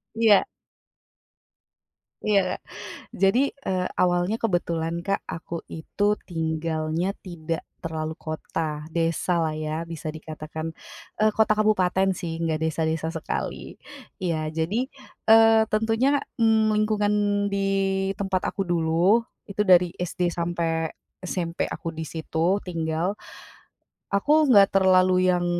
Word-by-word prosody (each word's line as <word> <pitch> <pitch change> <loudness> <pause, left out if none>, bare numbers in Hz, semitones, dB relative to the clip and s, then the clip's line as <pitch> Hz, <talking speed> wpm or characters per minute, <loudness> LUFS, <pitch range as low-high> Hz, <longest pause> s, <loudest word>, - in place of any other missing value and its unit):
Iya. 220 -3 +5 1.8
Iya. 200 -3 +2 0.5
Jadi, 220 +9 +2 0.2
eee, 185 -1 0
awalnya 175 +3 +2
kebetulan 170 -5 -1
Kak, 195 +1 0
aku 165 +1 -6
itu 205 +6 -1
tinggalnya 160 +2 -1
tidak 165 -3 -4 0.2
terlalu 160 -1 -3
kota. 155 +1 -5 0.3
Desalah 165 0 +1
ya, 155 +1 -3
bisa 160 -1 -5
dikatakan. 155 +1 -6 0.5
Eee, 215 - +5
kota 220 0 +4
kabupaten 195 -3 +2
sih, 170 -2 -4
enggak 165 -2 0
desa-desa 160 0 -1
sekali. 160 - -4 0.5
Iya, 170 -3 0 0.2
jadi, 165 +6 -1 0.5
eee, 225 0 +7
tentunya, 225 +4 +1 0.3
mmm, 220 -1 +4
lingkungan 210 -1 +1 0.4
di 200 - 0 0.6
tempat 195 -2 -1
aku 195 - -2
dulu, 175 +5 +3 0.2
itu 200 0 -6
dari 180 -1 +6
SD 180 +1 -4
sampai 165 -1 -1 0.3
SMP 175 -2 -2
aku 165 - -5
di 160 - -2
situ 165 +3 0
tinggal, 165 +1 -1 1.0
aku 295 +9 +3
enggak 200 -5 +7
terlalu 185 0 +5 0.2
yang 175 -1 +2
175 Hz, 110 wpm, -25 LUFS, 160-205 Hz, 1.8 s, eee